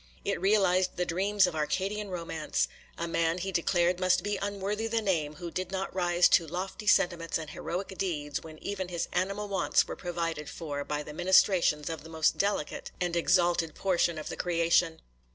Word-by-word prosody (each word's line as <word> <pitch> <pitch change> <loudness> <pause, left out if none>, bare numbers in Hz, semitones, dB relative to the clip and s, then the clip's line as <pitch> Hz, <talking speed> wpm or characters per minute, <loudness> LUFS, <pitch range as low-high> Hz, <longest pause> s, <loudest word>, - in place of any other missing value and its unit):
It 200 - -1
realized 190 -2 +3
the 180 - 0
dreams 195 +3 +2
of 180 -3 -3
Arcadian 195 +7 -1
romance. 165 -4 -2 0.3
A 170 - -2
man, 165 0 +1
he 190 +2 -3
declared, 175 0 +2
must 185 -1 +3
be 205 0 -1
unworthy 205 +2 -2
the 225 0 0
name, 165 -8 0
who 175 0 -7
did 185 +2 -4
not 190 0 -3
rise 175 -1 +4
to 165 - +4
lofty 185 +5 -5
sentiments 175 -4 +3
and 155 -2 -7
heroic 190 +4 -4
deeds, 150 -6 -2
when 155 -1 -11
even 190 -2 -3
his 175 -2 -3
animal 195 +3 -1
wants 195 -1 +2
were - - -5
provided 165 -4 -3
for 145 -4 -4
by 150 +1 -3
the 150 - -9
ministrations 175 -3 +3
of 165 -2 -4
the 160 - -11
most 160 -1 +1
delicate 200 -7 -1
and 175 -1 -1
exalted 170 -2 +2
portion 175 -3 +1
of 155 - -6
the - - -6
creation. 170 -1 +2
175 Hz, 185 wpm, -29 LUFS, 165-190 Hz, 0.3 s, rise